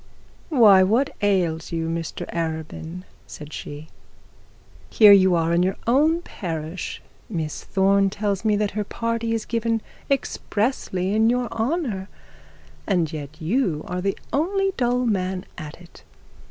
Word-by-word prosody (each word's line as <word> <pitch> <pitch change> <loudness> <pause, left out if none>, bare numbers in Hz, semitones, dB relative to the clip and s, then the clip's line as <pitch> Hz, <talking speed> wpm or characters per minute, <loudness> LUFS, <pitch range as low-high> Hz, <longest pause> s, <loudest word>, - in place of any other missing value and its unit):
'Why, 220 - +7
what 225 +9 +2
ails 180 -6 +1
you, 165 -1 -2
Mr 165 0 -4
Arabin?' 160 +1 -4 0.2
said 150 0 -10
she, 150 +2 -8 1.0
'here 210 -2 +7
you 190 -2 +6
are 165 0 +1
in 170 - +3
your 190 +2 +1
own 310 +8 +3
parish; 165 - -5 0.3
Miss 160 -7 -4
Thorne 195 0 +3
tells 200 0 -2
me 215 -2 +3
that 205 -1 0
her 210 +1 -2
party 230 +2 -2
is 220 - -3
given 230 0 0 0.3
expressly 210 -7 -1
in 220 +1 +4
your 245 0 +1
honour; 225 - -2 0.8
and 175 -5 +1
yet 150 -1 -7
you 175 - 0
are 180 0 -3
the 195 +1 -1 0.2
only 390 +6 +1
dull 250 0 +1
man 190 -4 -1
in 155 - -5
it. 170 +3 -13
195 Hz, 140 wpm, -23 LUFS, 170-230 Hz, 1.0 s, Why